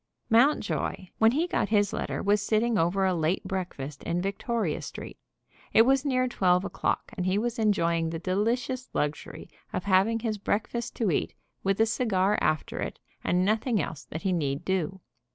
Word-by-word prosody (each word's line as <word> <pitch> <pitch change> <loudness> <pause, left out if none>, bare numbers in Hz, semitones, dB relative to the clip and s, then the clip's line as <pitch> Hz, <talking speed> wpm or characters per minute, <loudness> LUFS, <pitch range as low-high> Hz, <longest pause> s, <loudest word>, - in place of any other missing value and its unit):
Mountjoy, 225 -6 +2
when 225 +1 +5
he 315 +5 +2
got 350 - -1
his 205 -2 +2
letter, - - -3
was 205 0 +3
sitting 220 +2 +1
over 190 +2 +2
a 185 - +2
late 165 +2 0
breakfast 175 -7 -5
in 170 - -1
Victoria 195 -1 -2
Street. - - -8 0.5
It 225 - +8
was 265 +2 +3
near 255 -3 +1
twelve 185 -5 +2
o'clock, - - -2
and 185 -2 -2
he 185 +2 +2
was 235 +2 -1
enjoying 170 -6 +2
the 165 - -3
delicious 230 +8 -1
luxury 150 0 -3 0.2
of 180 - -3
having 200 +3 +3
his 220 -3 -2
breakfast 225 +4 -2
to 215 -6 +1
eat, - - -1 0.3
with 195 +1 +1
a 225 - +6
cigar 210 -3 +1
after 155 -1 0
it, - - -4 0.3
and 180 +1 +2
nothing 220 +2 +1
else 155 -2 -4
that 160 - -7
he 190 - +1
need 145 -4 -1
do. 190 0 -1
195 Hz, 175 wpm, -27 LUFS, 180-225 Hz, 0.5 s, It